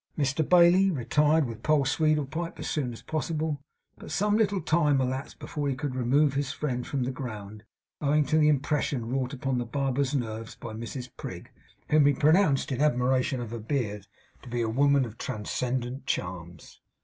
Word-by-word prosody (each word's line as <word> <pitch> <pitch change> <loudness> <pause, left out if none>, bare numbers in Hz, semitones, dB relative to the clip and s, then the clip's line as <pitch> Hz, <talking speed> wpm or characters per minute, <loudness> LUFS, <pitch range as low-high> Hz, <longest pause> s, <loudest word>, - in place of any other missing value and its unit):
Mr 145 +1 +1
Bailey 180 +3 +6
retired 150 +1 +2
with 115 -2 -7
Poll 150 -1 +2
Sweedlepipe 155 +2 0
as - - -5
soon 150 -6 -1
as 115 - -10
possible; 155 -2 -2 0.4
but - - -10
some 205 +7 +1
little 205 -3 +2
time 150 -4 +2
elapsed 130 +1 -3
before 145 -2 -3
he 135 - -1
could 140 0 -3
remove 135 +3 +2
his 140 -1 -1
friend 125 -5 -3
from 135 -3 -1
the 125 - -1
ground, 110 -5 -7 0.4
owing 150 +1 +3
to 155 +3 +2
the 150 - +5
impression 145 -3 0
wrought 130 +1 -1
upon 135 -2 -2
the - - -1
barber's 135 +2 -1
nerves 115 -2 -4
by 115 -2 -8
Mrs 120 +3 -6
Prig, - - -8 0.4
whom 150 -1 +5
he 145 - +4
pronounced, 150 -1 +3
in 130 +1 -1
admiration 130 -2 +2
of 120 -2 -5
her 115 - -4
beard, 105 -4 -3 0.3
to 125 - -12
be 120 0 -1
a 115 - 0
woman 140 +3 +3
of 115 -1 -10
transcendent 125 +3 -3
charms. 85 -2 -5
135 Hz, 180 wpm, -27 LUFS, 120-150 Hz, 0.4 s, Bailey